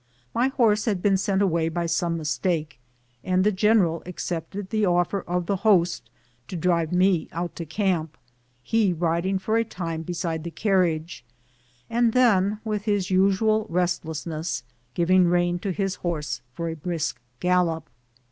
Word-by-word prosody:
My 245 Hz, +3 st, +2 dB
horse 230 Hz, -6 st, +2 dB
had 205 Hz, -5 st, 0 dB
been 200 Hz, -1 st, +4 dB
sent 195 Hz, +1 st, +1 dB
away 165 Hz, -4 st, +1 dB
by 170 Hz, +1 st, -2 dB
some 170 Hz, 0 st, 0 dB
mistake, 155 Hz, -1 st, -2 dB, 0.4 s
and 185 Hz, 0 st, +2 dB
the 210 Hz, -, +3 dB
general 190 Hz, -5 st, +3 dB
accepted 180 Hz, +2 st, -5 dB
the 215 Hz, -1 st, +1 dB
offer 175 Hz, +1 st, +1 dB
of 175 Hz, 0 st, -1 dB
the 195 Hz, +2 st, 0 dB
host 185 Hz, -4 st, +2 dB, 0.4 s
to 180 Hz, -, -6 dB
drive 170 Hz, -1 st, +1 dB
me 180 Hz, -2 st, +2 dB
out 170 Hz, +1 st, -4 dB
to 170 Hz, -, -5 dB
camp, 165 Hz, -3 st, -1 dB, 0.5 s
he 215 Hz, -, +2 dB
riding 170 Hz, +3 st, 0 dB
for 215 Hz, +4 st, 0 dB
a 230 Hz, -, +3 dB
time 165 Hz, -7 st, -5 dB
beside 165 Hz, -1 st, -3 dB
the 170 Hz, -, -4 dB
carriage, 170 Hz, -, 0 dB, 0.6 s
and 235 Hz, -1 st, +2 dB
then, 210 Hz, -5 st, +3 dB
with 210 Hz, -1 st, -2 dB
his 205 Hz, -3 st, 0 dB
usual 200 Hz, +3 st, +3 dB
restlessness, 160 Hz, -5 st, -2 dB, 0.3 s
giving 180 Hz, +1 st, +4 dB
rein 175 Hz, 0 st, +1 dB
to 195 Hz, -, -2 dB
his 195 Hz, 0 st, -1 dB
horse 150 Hz, -7 st, -3 dB
for 170 Hz, +3 st, -3 dB
a 165 Hz, -, -3 dB
brisk 155 Hz, -4 st, -3 dB, 0.2 s
gallop. 180 Hz, -3 st, +1 dB
180 Hz, 155 wpm, -25 LUFS, 165-200 Hz, 0.6 s, been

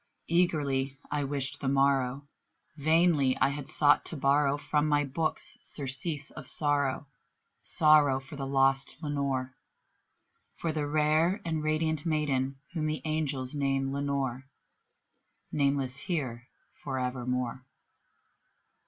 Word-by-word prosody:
Eagerly 145 Hz, -6 st, +1 dB
I 145 Hz, -1 st, 0 dB
wished 140 Hz, 0 st, -2 dB
the 135 Hz, -, -2 dB
morrow; 135 Hz, 0 st, +1 dB, 0.5 s
vainly 155 Hz, -3 st, +3 dB
I -, -, +3 dB
had 145 Hz, 0 st, -6 dB
sought 145 Hz, -1 st, +4 dB
to 165 Hz, -, -4 dB
borrow 140 Hz, +1 st, +3 dB
From 150 Hz, +1 st, 0 dB
my 145 Hz, -1 st, +3 dB
books 155 Hz, +4 st, -2 dB
surcease 140 Hz, +2 st, -1 dB
of -, -, -10 dB
sorrow 145 Hz, -2 st, 0 dB, 0.6 s
sorrow 150 Hz, -4 st, +4 dB
for 135 Hz, +2 st, -11 dB
the 135 Hz, -1 st, -4 dB
lost 135 Hz, 0 st, +2 dB
Lenore 140 Hz, -3 st, -2 dB, 1.0 s
For 165 Hz, -, -2 dB
the 150 Hz, -2 st, -2 dB
rare 155 Hz, +5 st, +2 dB
and 160 Hz, -2 st, -1 dB
radiant 155 Hz, 0 st, 0 dB
maiden 140 Hz, -5 st, 0 dB, 0.2 s
whom 155 Hz, -3 st, -1 dB
the 155 Hz, 0 st, -3 dB
angels 145 Hz, -4 st, -1 dB
name 135 Hz, -1 st, 0 dB
Lenore 140 Hz, -2 st, -2 dB, 1.0 s
Nameless 140 Hz, -2 st, 0 dB
here 130 Hz, -10 st, -3 dB, 0.3 s
for 135 Hz, -2 st, -4 dB
evermore. 125 Hz, 0 st, -2 dB
140 Hz, 120 wpm, -29 LUFS, 135-155 Hz, 1.0 s, sought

